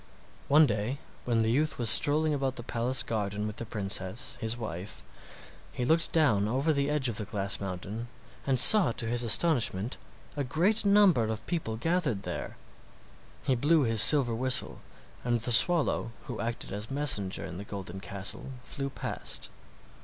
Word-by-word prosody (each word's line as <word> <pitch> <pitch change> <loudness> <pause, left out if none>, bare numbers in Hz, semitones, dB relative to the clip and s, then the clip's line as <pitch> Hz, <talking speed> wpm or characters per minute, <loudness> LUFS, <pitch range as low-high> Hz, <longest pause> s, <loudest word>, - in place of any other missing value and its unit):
One 150 +3 +6
day 110 +2 -2 0.3
when 115 -2 +1
the 110 - 0
youth 150 +5 0
was 120 - -1
strolling 150 +6 +4
about 135 -2 -2
the 120 - -7
palace 120 +1 0
garden 105 -2 -3
with 105 -1 -6
the 115 - -6
princess, 95 0 -2
his 110 +1 -2
wife, 100 -4 -7 0.7
he 125 - -3
looked 160 +5 +1
down 110 -11 +2
over 135 +8 0
the 140 0 -1
edge 150 -3 0
of 115 -4 -3
the - - -2
glass 100 -1 -2
mountain 100 +5 -6 0.4
and 130 -2 +2
saw 195 - +8
to 115 - -3
his 120 +1 -1
astonishment 120 - +1 0.4
a 145 - -2
great 175 - 0
number 200 - +4
of 110 0 -5
people 160 -11 -3
gathered 140 - -1
there. - - -6 0.9
He 130 - +1
blew 150 +5 +2
his 115 -3 +2
silver 135 -3 +5
whistle, 130 +2 -1 0.4
and 120 -1 0
the 120 - -2
swallow 140 -3 +2
who 120 -6 -7
acted 115 -3 -5
as 105 +3 -6
messenger 135 -9 0
in 90 - -8
the - - -6
golden 95 -2 -8
castle 100 +4 -6
flew 140 0 -5
past. - - -5
120 Hz, 170 wpm, -28 LUFS, 105-145 Hz, 0.9 s, saw